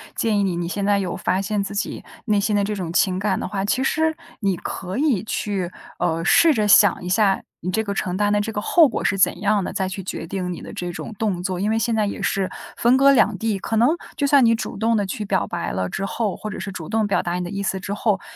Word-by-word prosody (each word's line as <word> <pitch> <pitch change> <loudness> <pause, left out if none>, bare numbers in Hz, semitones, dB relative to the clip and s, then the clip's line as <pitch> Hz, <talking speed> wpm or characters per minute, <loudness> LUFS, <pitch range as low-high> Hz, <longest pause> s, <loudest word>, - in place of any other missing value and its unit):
建 220 -3 +1
议 - - +2
你， 190 -3 0
你 170 0 -2
现 200 +2 -2
在 205 0 +3
有 190 -3 -2
发 185 +1 0
现 205 +1 -1
自 200 - -6
己 205 - -3 0.2
内 210 -3 +2
心 210 +1 0
的 205 - +2
这 210 +1 -2
种 180 -5 -4
情 185 +1 +2
感 195 -1 0
的 - - -3
话， 195 -1 -2
其 255 +6 +1
实 315 +3 +1 0.2
你 195 -3 +1
可 185 +2 -5
以 270 -9 +2
去， 200 -4 -2 0.3
呃， 165 0 0
试 320 - +5
着 215 -5 +1
想 205 -3 +5
一 180 - -4
下 195 0 +2 0.2
你 180 - -3
这 220 +4 0
个 200 -2 -3
承 185 -2 -2
担 205 +1 +1
的 205 - +3
这 220 +2 -3
个 210 - -2
后 325 +8 +5
果 240 - -3
是 200 - +1
怎 185 -1 +2
样 205 0 +2
的， - - -5
再 190 -1 -1
去 190 +1 -5
决 185 -2 -5
定 180 0 -3
你 - - -8
的 - - -9
这 175 -1 -5
种 220 - -7
动 195 -5 -1
作， 185 -1 -2
因 205 +3 0
为 220 - +1
现 230 +1 0
在 215 -1 +2
也 200 - -4
是 195 -1 0 0.3
分 240 +2 +4
隔 275 +1 +6
两 220 -6 +3
地， 215 0 -1
可 225 - -3
能 235 +4 +4 0.3
就 285 - 0
算 280 -2 +5
你 230 0 +4
主 225 - -5
动 225 +2 +2
的 205 -2 +1
去 210 +2 -4
表 195 -1 0
白 175 - -4
了 95 0 -2
之 195 - -3
后， 205 0 -2
或 215 - -6
者 210 - -6
是 195 +1 -5
主 165 -4 -7
动 220 -1 +1
表 200 - +1
达 175 - -3
你 180 0 -2
的 175 - -5
意 200 - -3
思 190 -1 -2
之 200 - -4
后， 205 -2 0
200 Hz, 305 characters per minute, -22 LUFS, 185-220 Hz, 0.3 s, 隔